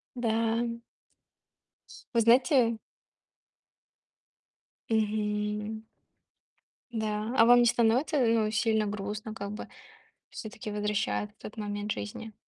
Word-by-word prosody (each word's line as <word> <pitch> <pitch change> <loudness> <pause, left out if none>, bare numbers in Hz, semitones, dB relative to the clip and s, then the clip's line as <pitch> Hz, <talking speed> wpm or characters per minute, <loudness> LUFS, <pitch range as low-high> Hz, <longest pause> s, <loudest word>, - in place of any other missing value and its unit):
Да. 230 0 0 1.3
Вы 230 - +4
знаете 240 0 +4 2.1
Мгм. 210 0 -1 1.1
Да. 215 +1 -2
А 225 - +7
вам 245 +1 +7
не 240 - +5
становится, 240 +7 +2
э, 230 -3 +3
ну, 215 -2 +1
сильно 220 -1 +1
грустно, 210 +1 -4
как 200 -1 -6
бы? 210 - -7 0.6
Всё-таки, 215 -1 -7
возвращает 210 0 -1
в - - -36
тот 210 - -9
момент 205 0 -3
жизни. 105 - -6
220 Hz, 100 wpm, -29 LUFS, 210-230 Hz, 2.1 s, А